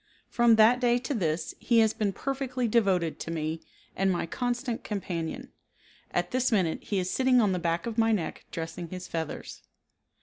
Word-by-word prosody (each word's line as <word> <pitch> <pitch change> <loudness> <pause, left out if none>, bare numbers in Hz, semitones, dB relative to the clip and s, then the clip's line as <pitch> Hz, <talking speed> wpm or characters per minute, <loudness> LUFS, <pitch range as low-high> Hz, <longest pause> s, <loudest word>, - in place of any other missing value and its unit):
From 235 -1 +5
that 225 +3 +6
day 240 -1 +3
to 245 +3 -3
this 165 - -1
he 235 - +2
has 220 -1 +5
been 210 -2 0
perfectly 260 +1 -2
devoted 195 -8 +2
to - - -6
me 160 0 -3 0.3
and 195 0 +2
my 175 - -1
constant 245 +5 -2
companion. 195 +5 -4 0.6
At - - -1
this 255 0 +1
minute 185 -7 +1
he 205 - -1
is 185 -1 -1
sitting 260 -1 +4
on 210 -4 +3
the 180 - 0
back 170 0 -1
of 230 -1 -3
my 225 0 +4
neck 195 -7 -2
dressing 165 +1 -5
his 185 0 -7
feathers. 160 -2 -5
210 Hz, 180 wpm, -28 LUFS, 170-240 Hz, 0.6 s, that